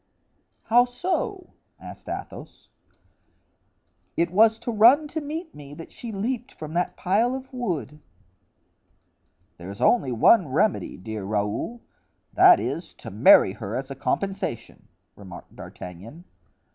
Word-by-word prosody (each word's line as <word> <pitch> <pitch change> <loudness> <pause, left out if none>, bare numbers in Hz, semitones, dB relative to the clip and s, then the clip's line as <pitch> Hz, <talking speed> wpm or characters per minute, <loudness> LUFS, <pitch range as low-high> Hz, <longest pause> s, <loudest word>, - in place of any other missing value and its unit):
"How 240 +2 +4
so?" 365 - -3 0.3
asked - - -11
Athos. - - -8 1.5
"It 170 0 +1
was 220 +3 +4
to 240 - -5
run 240 +8 +5
to 315 +1 -4
meet 315 +3 -6
me 145 0 -11
that 165 - -11
she 235 - -8
leaped 240 +5 -3
from 155 0 -8
that 175 +1 -1
pile 225 +7 +1
of 265 0 -9
wood." 170 - -4 1.6
"There's 95 +4 -9
only 185 - +2
one 160 - +4
remedy, 160 +10 0
dear 105 +2 -6
Raoul—that 105 - +1
is, - - -5
to - - -10
marry - - +6
her - - -6
as - - -4
a - - -5
compensation." 195 - -4 0.3
remarked 95 -3 -12
D'Artagnan. 100 - -10
195 Hz, 120 wpm, -24 LUFS, -, 1.6 s, marry